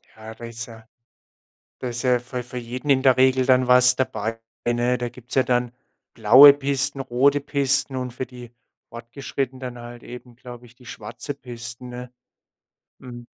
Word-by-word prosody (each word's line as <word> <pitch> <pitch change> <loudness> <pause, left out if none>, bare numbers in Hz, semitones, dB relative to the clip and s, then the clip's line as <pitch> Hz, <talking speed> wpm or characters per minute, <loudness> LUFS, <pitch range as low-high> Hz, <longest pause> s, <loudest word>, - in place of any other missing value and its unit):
Ja, 110 0 -11
da 120 - -10
ist 115 0 -7
ja 115 -1 -14 0.9
da 125 - -5
ist 120 0 -4
ja 125 -1 +2
für 125 +1 -6
für 125 +1 -8
jeden 125 +4 -5
in 130 -1 +3
der 130 -2 +4
Regel 130 0 +3
dann 130 -1 +3
was 125 0 +5
dabei, 115 -3 -3 0.3
ne? 120 +1 +1
Da 120 0 -3
gibt's 125 +1 -11
ja 130 - +4
dann 125 -1 -1 0.4
blaue 140 +2 +9
Pisten, 140 0 -2
rote 135 +2 +2
Pisten 140 -1 0
und 125 -1 -4
für 130 +1 -5
die 120 -2 -12 0.4
Fortgeschrittenen 130 +2 -6
dann 125 -2 -7
halt 120 0 -11
eben, 125 -1 -12
glaube 120 0 -12
ich, 120 - -20
die 125 0 -20
schwarze 145 - -7
Pisten, 120 -2 -9
ne? 125 0 -9 0.9
Mhm. 120 -2 -11
125 Hz, 175 wpm, -23 LUFS, 120-130 Hz, 0.9 s, blaue